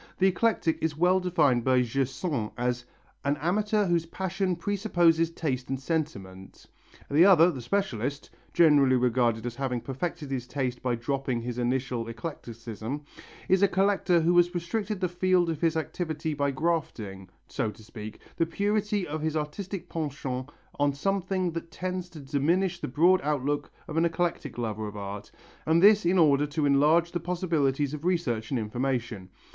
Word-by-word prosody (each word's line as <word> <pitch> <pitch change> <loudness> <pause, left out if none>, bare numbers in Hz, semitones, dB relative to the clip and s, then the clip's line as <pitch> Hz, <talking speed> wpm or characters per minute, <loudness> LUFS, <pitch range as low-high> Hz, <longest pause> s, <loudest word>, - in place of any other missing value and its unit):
The 190 - +3
eclectic 185 -4 +1
is 160 -2 -1
well 180 +3 +4
defined 155 -10 +2
by 130 0 +3
Gersaint 135 0 -2
as 125 0 -1 0.4
"an 140 +1 +1
amateur 210 +6 +1
whose 170 -2 +1
passion 190 +1 -2
presupposes 175 -4 +2
taste 135 -7 -3
and 135 -1 -2
sentiment"; 105 - -4 0.5
the 150 +4 +6
other, 180 -3 +7
the 135 -6 -6
specialist 140 - -2 0.2
generally 145 -6 +5
regarded 120 -2 +1
as 120 -1 -4
having 130 -3 -1
perfected 145 +4 -5
his 125 -2 -3
taste 125 -2 -3
by 125 -2 0
dropping 130 +1 -2
his 120 +1 -4
initial 125 -1 -1
eclecticism 115 -1 -6 0.4
is 190 0 +3
a 200 - +6
collector 190 -3 +2
who 170 +2 +3
has 175 +1 +4
restricted 200 +4 -2
the 180 - +2
field 180 -1 +2
of 160 - -5
his 165 -1 +2
activity 160 -1 -3
by 140 -1 0
grafting, 130 - -2 0.2
so 120 -6 -2
to 110 - -12
speak, 110 -1 -9 0.2
the 165 - +2
purity 205 +2 0
of 155 +1 -4
his 160 0 -1
artistic 180 +5 -5
penchant 140 -4 -4 0.3
on 145 0 +2
something 185 +3 -1
that 165 0 -6
tends 180 +1 -4
to 165 - -11
diminish 155 +7 0
the - - -4
broad 175 +8 +4
outlook 145 0 -1 0.2
of 155 - -5
an 165 - +4
eclectic 170 -5 -2
lover 110 -2 -3
of 105 0 -8
art, 100 0 -6 0.4
and 160 +1 +4
this 205 0 +6
in 185 +2 +3
order 150 -3 +4
to 150 +1 -1
enlarge 150 +5 +4
the 175 - -2
possibilities 155 -6 0
of 150 0 -6
research 150 -12 0
and 130 - 0
information. 115 -3 -3
150 Hz, 165 wpm, -27 LUFS, 125-175 Hz, 0.5 s, other